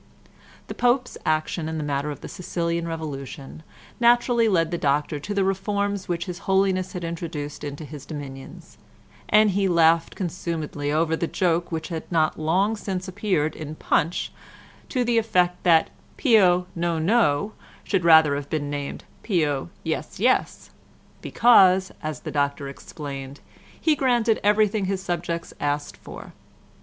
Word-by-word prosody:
The -, -, -7 dB
Pope's 245 Hz, +1 st, +1 dB
action 155 Hz, +1 st, 0 dB
in 160 Hz, -, -4 dB
the 155 Hz, -, -2 dB
matter 145 Hz, 0 st, -2 dB
of 145 Hz, -, -7 dB
the -, -, -7 dB
Sicilian 170 Hz, -1 st, -3 dB
revolution 150 Hz, -3 st, -6 dB, 0.4 s
naturally 240 Hz, -1 st, +4 dB
led 165 Hz, -4 st, +2 dB
the 170 Hz, -, -1 dB
Doctor 145 Hz, +1 st, 0 dB
to 145 Hz, -, -7 dB
the 200 Hz, -, +2 dB
reforms 200 Hz, +1 st, -1 dB
which 170 Hz, -1 st, -2 dB
his 180 Hz, -1 st, -6 dB
Holiness 190 Hz, -1 st, +2 dB
had 180 Hz, -2 st, -5 dB
introduced 165 Hz, -4 st, -5 dB
into 145 Hz, +1 st, -6 dB
his 145 Hz, -2 st, -10 dB
dominions, 135 Hz, -3 st, -9 dB, 0.5 s
and 215 Hz, 0 st, +5 dB
he 195 Hz, +1 st, +1 dB
laughed 165 Hz, -1 st, +3 dB
consumedly 160 Hz, -5 st, -3 dB
over 160 Hz, +1 st, +1 dB
the 170 Hz, -, -2 dB
joke 175 Hz, -1 st, 0 dB
which 160 Hz, +1 st, -4 dB
had 165 Hz, 0 st, -6 dB
not 160 Hz, -2 st, +1 dB
long 185 Hz, +8 st, +1 dB
since 190 Hz, -3 st, -4 dB
appeared 180 Hz, -5 st, -1 dB
in 155 Hz, 0 st, -7 dB
Punch, 165 Hz, +2 st, 0 dB, 0.6 s
to 255 Hz, -2 st, 0 dB
the 235 Hz, -1 st, +2 dB
effect 180 Hz, -5 st, +1 dB
that 165 Hz, -3 st, +4 dB, 0.3 s
Pio 185 Hz, -, +4 dB
"No, 170 Hz, -1 st, -1 dB
No," 180 Hz, -1 st, +2 dB, 0.3 s
should 195 Hz, -4 st, 0 dB
rather 160 Hz, -3 st, +7 dB
have 140 Hz, 0 st, -4 dB
been 145 Hz, -2 st, -2 dB
named 145 Hz, -1 st, -5 dB, 0.2 s
Pio 155 Hz, -, 0 dB
"Yes, 160 Hz, +2 st, -4 dB
Yes," 250 Hz, +5 st, +1 dB, 0.5 s
because, 190 Hz, -5 st, +5 dB
as 155 Hz, -1 st, -5 dB
the -, -, -6 dB
doctor 140 Hz, -1 st, -1 dB
explained, 140 Hz, -1 st, -8 dB, 0.4 s
he 315 Hz, -2 st, +2 dB
granted 240 Hz, -5 st, +2 dB
everything 210 Hz, 0 st, +3 dB
his 190 Hz, 0 st, -2 dB
subjects 170 Hz, -2 st, -3 dB
asked 145 Hz, 0 st, -2 dB
for. -, -, -11 dB
170 Hz, 150 wpm, -24 LUFS, 150-195 Hz, 0.6 s, rather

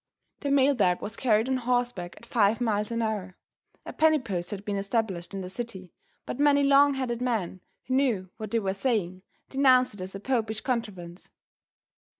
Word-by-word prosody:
The 285 Hz, -, -3 dB
mail 280 Hz, 0 st, +4 dB
bag 180 Hz, -8 st, +2 dB
was 215 Hz, -, -5 dB
carried 225 Hz, -2 st, +2 dB
on 260 Hz, 0 st, +1 dB
horseback 245 Hz, -8 st, -1 dB
at -, -, -13 dB
five 225 Hz, -2 st, +2 dB
miles 210 Hz, -3 st, 0 dB
an 230 Hz, 0 st, -1 dB
hour. 200 Hz, -4 st, -3 dB, 0.5 s
A -, -, -7 dB
penny 315 Hz, 0 st, +4 dB
post 190 Hz, -9 st, -4 dB
had 205 Hz, 0 st, -6 dB
been 205 Hz, -, -2 dB
established 195 Hz, -3 st, -2 dB
in 195 Hz, -, -3 dB
the 185 Hz, -, -6 dB
city, 190 Hz, -3 st, -6 dB, 0.3 s
but -, -, -5 dB
many 285 Hz, -1 st, +4 dB
long 280 Hz, 0 st, +5 dB
headed 245 Hz, -3 st, -2 dB
men, 215 Hz, -7 st, -2 dB, 0.2 s
who 255 Hz, -, -3 dB
knew 240 Hz, -9 st, +1 dB
what 215 Hz, -2 st, -6 dB
they 230 Hz, -, 0 dB
were 195 Hz, -4 st, -1 dB
saying, 195 Hz, -5 st, -1 dB, 0.3 s
denounced 255 Hz, -3 st, +4 dB
it 205 Hz, -, -9 dB
as 185 Hz, +1 st, -6 dB
a -, -, -5 dB
popish 220 Hz, -2 st, -1 dB
contrivance. 195 Hz, -9 st, -4 dB
225 Hz, 185 wpm, -27 LUFS, 195-255 Hz, 0.5 s, long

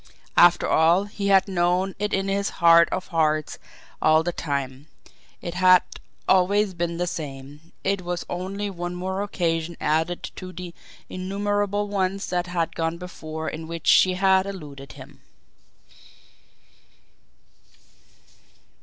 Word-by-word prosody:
After 175 Hz, 0 st, +5 dB
all, 170 Hz, +4 st, +4 dB
he 205 Hz, 0 st, -5 dB
had 195 Hz, 0 st, +4 dB
known 180 Hz, +1 st, +1 dB
it 210 Hz, 0 st, -1 dB
in 195 Hz, 0 st, 0 dB
his 200 Hz, +1 st, 0 dB
heart 170 Hz, 0 st, +6 dB
of 185 Hz, -, -3 dB
hearts 155 Hz, -3 st, 0 dB, 0.4 s
all 155 Hz, +1 st, +4 dB
the 175 Hz, -, -1 dB
time 140 Hz, -3 st, -4 dB, 0.6 s
it 170 Hz, -, -4 dB
had 185 Hz, 0 st, +5 dB, 0.4 s
always 195 Hz, +2 st, +3 dB
been 170 Hz, -1 st, -3 dB
the 175 Hz, -, 0 dB
same 145 Hz, -1 st, -7 dB
it 195 Hz, 0 st, 0 dB
was 175 Hz, 0 st, -4 dB
only 195 Hz, +3 st, -4 dB
one 175 Hz, -1 st, -5 dB
more 190 Hz, +2 st, -3 dB
occasion 170 Hz, -4 st, -2 dB
added 160 Hz, +3 st, 0 dB
to 185 Hz, -1 st, -7 dB
the 180 Hz, -1 st, -8 dB, 0.3 s
innumerable 205 Hz, +2 st, -2 dB
ones 195 Hz, -1 st, -1 dB
that 180 Hz, 0 st, -1 dB
had 170 Hz, -2 st, -2 dB
gone 165 Hz, 0 st, -2 dB
before 160 Hz, -3 st, -7 dB
in 160 Hz, +1 st, -5 dB
which 165 Hz, -1 st, -7 dB
she 185 Hz, -1 st, +5 dB
had 190 Hz, 0 st, +3 dB
eluded 145 Hz, -8 st, -9 dB
him! -, -, -14 dB
180 Hz, 130 wpm, -24 LUFS, 165-190 Hz, 0.6 s, heart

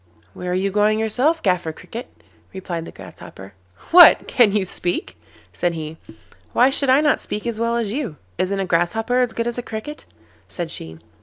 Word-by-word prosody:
'Where 180 Hz, -, -6 dB
are 180 Hz, -, 0 dB
you 195 Hz, +1 st, 0 dB
going 210 Hz, +2 st, +2 dB
yourself, 255 Hz, +9 st, +1 dB
Gaffer 180 Hz, -4 st, 0 dB
Cricket?' 225 Hz, +10 st, -10 dB, 0.3 s
replied 175 Hz, -3 st, -5 dB
the -, -, -9 dB
Grasshopper. 95 Hz, +1 st, -12 dB, 0.4 s
'What! 350 Hz, +1 st, +8 dB
can 235 Hz, -5 st, +4 dB
you 200 Hz, -1 st, 0 dB
speak?' 175 Hz, -, -3 dB, 0.4 s
said 170 Hz, -, -1 dB
he. 160 Hz, 0 st, -6 dB, 0.6 s
'Why 255 Hz, +3 st, +4 dB
should 275 Hz, 0 st, 0 dB
I 265 Hz, +3 st, +5 dB
not 295 Hz, -2 st, +2 dB
speak 210 Hz, -, -5 dB
as 230 Hz, -2 st, -3 dB
well 230 Hz, 0 st, 0 dB
as 225 Hz, -4 st, -2 dB
you? 245 Hz, -, -4 dB, 0.2 s
Isn't 195 Hz, +1 st, 0 dB
a 195 Hz, -, -1 dB
Grasshopper 210 Hz, +8 st, 0 dB
as 250 Hz, -2 st, +1 dB
good 230 Hz, -, -2 dB
as 240 Hz, +1 st, -3 dB
a -, -, -2 dB
Cricket?' 235 Hz, +7 st, -7 dB, 0.4 s
said 170 Hz, -3 st, -5 dB
she. 80 Hz, 0 st, -6 dB
210 Hz, 185 wpm, -21 LUFS, 175-240 Hz, 0.6 s, What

